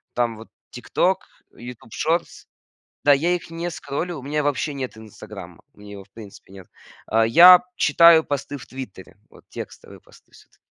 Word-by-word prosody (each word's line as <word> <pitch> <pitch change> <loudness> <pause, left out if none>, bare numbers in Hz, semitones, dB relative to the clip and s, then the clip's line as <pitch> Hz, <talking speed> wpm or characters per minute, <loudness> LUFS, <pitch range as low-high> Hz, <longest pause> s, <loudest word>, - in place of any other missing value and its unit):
там 120 -2 -1
вот 110 - -13 0.2
"Тикток", 185 +9 -1 0.3
"Ютуб 120 -2 -12
шортс". 170 +1 -2 0.6
Да, 145 - +6
я 155 +6 0
их 170 -1 -8
не 170 +1 -4
скроллю, 170 +1 -5
у 130 - -10
меня 150 +2 -2
вообще 145 0 -2
нет 130 -4 -6
"Инстаграма", 105 -5 -12
у - - -25
меня 105 0 -13
его 100 -1 -10
в 100 - -29
принципе 100 -3 -14
нет. 95 -2 -13 0.4
Э, 110 +1 +3
я 175 +9 +9 0.2
читаю 165 +1 +5
посты 145 0 -5
в - - -12
"Твиттере", 130 -6 -11
вот - - -19
текстовые - - -10
посты - - -23
всё-та - - -22
130 Hz, 175 wpm, -22 LUFS, 110-160 Hz, 0.6 s, я